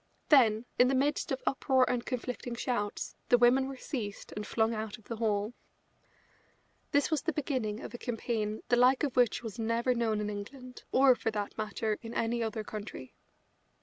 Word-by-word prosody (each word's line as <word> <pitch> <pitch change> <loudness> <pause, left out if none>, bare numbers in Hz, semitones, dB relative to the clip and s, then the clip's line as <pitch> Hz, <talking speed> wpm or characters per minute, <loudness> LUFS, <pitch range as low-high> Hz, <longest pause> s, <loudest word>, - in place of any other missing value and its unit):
Then, 230 -6 +5
in 250 - +7
the 265 - +2
midst 285 +3 +1
of 265 - -2
uproar 265 -1 +3
and 245 -1 0
conflicting 250 -1 -4
shouts, 235 -4 -2
the 245 - +7
women 250 +2 +4
were 270 -1 -6
seized 220 -8 -5
and 210 0 -5
flung 225 0 +1
out 220 0 -4
of 220 - -20
the 230 +2 -6
hall. 215 0 0 1.4
This 285 +2 +2
was 315 - +2
the 330 - 0
beginning 255 -8 -2
of - - -8
a 240 - -7
campaign 225 -3 -2
the 245 - +4
like 255 +3 +5
of 280 -4 -1
which 245 -2 +3
was 225 0 -6
never 230 +3 +1
known 225 -3 0
in 210 - -2
England, 250 +5 -8
or, 265 0 +6
for 235 - -2
that 210 -2 -3
matter, 215 0 -2
in 230 0 -8
any 235 +1 0
other 220 -1 -2
country. 205 -11 -7
235 Hz, 185 wpm, -31 LUFS, 215-255 Hz, 1.4 s, in